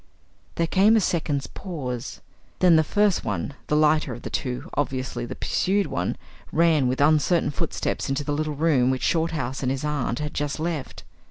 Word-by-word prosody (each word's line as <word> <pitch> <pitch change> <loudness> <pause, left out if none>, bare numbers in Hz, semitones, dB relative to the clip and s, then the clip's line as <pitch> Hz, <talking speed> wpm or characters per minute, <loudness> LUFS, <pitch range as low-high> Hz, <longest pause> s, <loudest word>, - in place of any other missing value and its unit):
There 170 - +1
came 200 +6 +4
a - - +5
second's 155 -7 0
pause. 130 - -6 0.4
Then 180 -2 +5
the 160 - +5
first 205 +3 +2
one, 105 +5 -3
the 150 - +1
lighter 150 -3 +3
of 120 - -11
the - - -6
two, 125 -2 -3
obviously 130 -4 -2
the - - -6
pursued 200 +2 +1
one, 90 +1 -2 0.3
ran 160 -5 +3
with 130 +1 -1
uncertain 155 +3 +3
footsteps 140 - -2
into 135 +2 -1
the 145 - -2
little 155 0 -2
room 140 -5 +3
which 130 -1 -1
Shorthouse 160 -6 0
and 130 -1 0
his 135 +2 -3
aunt 145 -5 -1
had 150 +1 -4
just 145 0 -2
left. 160 -4 -4
150 Hz, 180 wpm, -24 LUFS, 130-165 Hz, 0.4 s, a